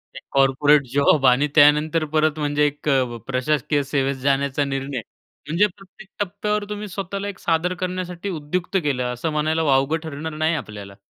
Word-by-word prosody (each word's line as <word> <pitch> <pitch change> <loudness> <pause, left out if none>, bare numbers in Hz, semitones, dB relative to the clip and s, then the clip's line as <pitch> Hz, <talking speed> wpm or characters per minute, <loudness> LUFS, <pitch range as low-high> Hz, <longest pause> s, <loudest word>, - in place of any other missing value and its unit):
एक - - -8
corporate 140 +2 +4
job 140 0 +3
आणि 130 +4 +4
त्यानंतर 155 +2 +5
परत 155 0 +2
म्हणजे 145 0 +1
एक 145 +1 -2
अ, 130 -4 +1
प्रशासकीय 145 +2 0
सेवेत 135 0 -1
जाण्याचा 140 0 +1
निर्णय. 135 -2 -3 0.5
म्हणजे 170 +7 +3
प्रत्येक 195 +1 -16
टप्प्यावर 205 +2 -1
तुम्ही 210 0 -5
स्वतःला 195 +1 -5
एक 200 -2 -7
सादर 170 +2 0
करण्यासाठी 185 +1 -4
उद्युक्त 175 +3 -2
केलं 130 -4 0
असं 140 +6 -3
म्हणायला 155 +2 0
वावगं 140 +2 +2
ठरणार 160 +1 -6
नाही 160 +1 +1
आपल्याला. 100 -7 -7
150 Hz, 155 wpm, -22 LUFS, 140-170 Hz, 0.5 s, त्यानंतर